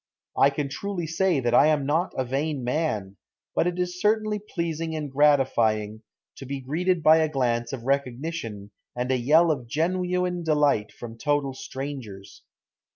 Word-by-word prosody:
I 140 - +5
can 140 0 -3
truly 180 +5 -4
say 165 0 +1
that 120 -1 0
I 145 - +6
am 150 -3 +2
not 160 +6 0
a 130 - 0
vain 140 +2 -2
man, 120 - -2 0.4
but - - +1
it 180 0 -2
is 180 0 -3
certainly 215 0 +1
pleasing 165 -5 -4
and 150 -3 -4
gratifying 115 -7 +2 0.4
to 135 - -8
be 140 +1 -4
greeted 165 +6 -1
by 155 +1 +7
a 160 -1 +2
glance 120 -4 0
of 130 -4 -6
recognition 130 -5 -3 0.2
and 125 +1 -2
a - - +3
yell 155 +7 +4
of 125 -6 -3
genuine 180 +4 -1
delight 150 -9 +2
from 115 -1 -10
total 145 -2 0
strangers. 130 -8 -8
145 Hz, 160 wpm, -25 LUFS, 125-165 Hz, 0.4 s, by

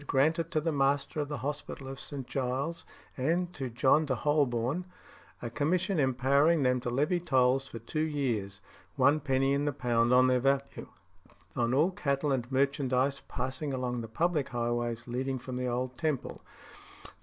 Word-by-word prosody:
granted 160 +5 +2
to 165 -3 +1
the 165 +2 -1
Master 140 +1 +1
of 145 - -1
the 145 - -3
Hospital 145 -2 -5
of 135 -1 -7
St. 140 -3 -6
Giles 135 +6 -3 0.3
and 170 +7 0
to 135 -3 -4
John 135 +6 +3
de 130 - +1
Holborne, 140 +3 +1 0.6
a 120 - -4
commission 175 - 0
empowering 140 +4 +3
them 125 0 +2
to 125 0 -3
levy 150 +8 +1
tolls 135 -4 +2
for 115 - -8
two 115 +7 -4
years 120 -11 -2 0.3
(one 140 +3 +4
penny 135 -1 +1
in 140 +1 0
the 145 - +1
pound 120 -3 +1
on 125 0 +6
their 130 0 +3
value) 135 +1 -1 0.7
on 120 +1 +1
all 160 +7 +3
cattle 140 -6 -1
and 125 -1 -1
merchandise 135 0 +1
passing 135 +3 -3
along 125 -2 -2
the 115 - -6
public 155 +5 0
highways 120 0 -2
leading 130 +2 -2
from 130 0 -7
the 125 0 -2
old 125 +1 -2
Temple, 155 -5 -2 0.6
_i. - - -12
135 Hz, 170 wpm, -30 LUFS, 125-150 Hz, 0.7 s, on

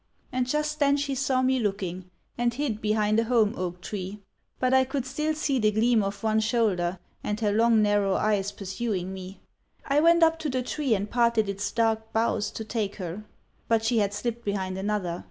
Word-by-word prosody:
And 255 -1 0
just 300 +2 -1
then 280 -1 +4
she 285 -1 -1
saw 260 -1 +1
me 260 0 +2
looking, 185 -4 -3 0.3
and 240 0 +1
hid 245 -6 -2
behind 215 0 +2
a 230 - +1
holm 225 -3 +3
oak 180 -1 -4
tree; 200 +1 -5 0.4
but 255 0 +2
I 260 0 +6
could 265 0 -3
still 300 +4 -1
see 280 -3 0
the 215 -2 +3
gleam 220 +2 +3
of 200 +2 -4
one 220 0 +2
shoulder 210 -6 +1 0.3
and 210 0 -2
her 210 -2 +1
long 225 +1 +4
narrow 205 -2 +2
eyes 205 -2 +1
pursuing 195 -2 -3
me. 190 0 -9 0.4
I 280 +1 +2
went 335 +2 +5
up 325 0 +4
to 310 - -2
the 255 -1 -1
tree 270 -3 0
and 200 +1 -2
parted 235 -2 +2
its 200 0 -3
dark 225 -1 0
boughs 220 -2 +1
to 220 - -7
take 215 -3 -2
her; 185 +2 -6 0.4
but 225 -1 +2
she 230 0 +2
had 200 -1 +1
slipped 235 +2 -4
behind 190 -3 -2
another. 190 -3 -2
220 Hz, 200 wpm, -26 LUFS, 200-255 Hz, 0.4 s, I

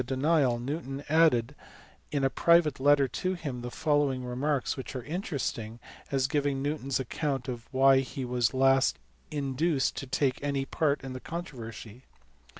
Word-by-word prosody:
denial 135 -1 +2
Newton 135 +2 -4
added 150 -6 +4 0.6
in 140 -2 0
a 135 - +4
private 170 -4 +4
letter 140 0 +4
to 185 +8 -2
him 140 -8 -5
the 120 - -5
following 145 -3 0
remarks 130 +3 -1
which 130 -1 -7
are 125 - -4
interesting 135 - -4 0.3
as 135 -2 +2
giving 140 0 0
Newton 145 -1 -3
s 135 - +1
account 135 0 -2
of 120 -3 -6
why 135 0 +5
he 135 0 -4
was 120 -2 +1
at - - -10
last 135 0 +4 0.3
induced 145 0 0
to 135 - -5
take 135 0 0
any 140 -1 -1
part 145 0 0
in 130 -1 -6
the 130 - -6
con 170 +6 -5
troversy. 115 - -9
135 Hz, 165 wpm, -29 LUFS, 130-145 Hz, 0.6 s, why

